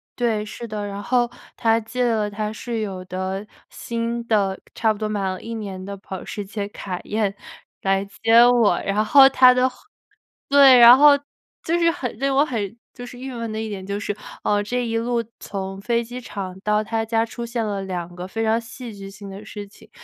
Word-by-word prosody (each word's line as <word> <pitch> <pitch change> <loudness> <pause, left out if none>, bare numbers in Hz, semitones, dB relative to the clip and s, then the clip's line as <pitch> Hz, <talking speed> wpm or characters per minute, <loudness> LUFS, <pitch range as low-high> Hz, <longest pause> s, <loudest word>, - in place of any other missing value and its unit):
对， 225 -3 0
是 235 +2 -8
的。 210 -1 -4
然 200 0 -6
后 240 +2 +1 0.3
他 225 0 +2
借 250 +3 -3
了 215 -3 +1
他 210 +1 -3
室 230 +1 -4
友 190 -3 -4
的 190 +2 -4 0.2
新 235 0 -4
的 200 -3 +1
差 220 -1 +2
不 210 - -4
多 215 0 -2
买 210 -2 -2
了 185 - -5
1 230 +1 -6
年 195 -4 -6
的 200 +1 -6
保 190 -1 -8
时 205 - -5
捷 200 0 -4
凯 185 -3 -6
宴 210 -2 -1 0.5
来 195 0 +1
接 225 +4 +4
我， 240 -3 +4
然 205 +2 +1
后 270 +3 +8
他 255 -1 +7
的 255 +1 +2
后 250 - -19 0.7
对， 275 -2 +8
然 240 +2 +10
后 290 0 +7 0.5
就 335 +2 +1
是 335 -1 +3
很 350 - -5
令 275 0 +1
我 285 - +5
很 225 -4 -4 0.2
就 245 - -9
是 245 0 -11
郁 265 0 -6
闷 230 -2 -5
的 220 0 -3
一 220 - -4
点 190 -2 -6
就 200 +1 -3
是， 205 0 -3 0.3
呃， 205 0 +1
这 245 +4 -2
一 225 0 -1
路 235 0 0 0.2
从 195 -1 -5
飞 235 +2 0
机 245 +2 -7
场 190 -5 -7
到 210 0 +1
他 225 0 -2
家 225 0 +1
出 235 +1 -7
现 235 -1 -2
了 200 -2 -2
2 175 -2 -5
个 180 +1 -6
非 225 +3 -3
常 220 +1 +2
戏 230 0 -9
剧 195 0 -9
性 200 0 -10
的 200 +2 -9
事 205 -1 -8
情。 200 - -19
220 Hz, 225 characters per minute, -22 LUFS, 200-235 Hz, 0.7 s, 然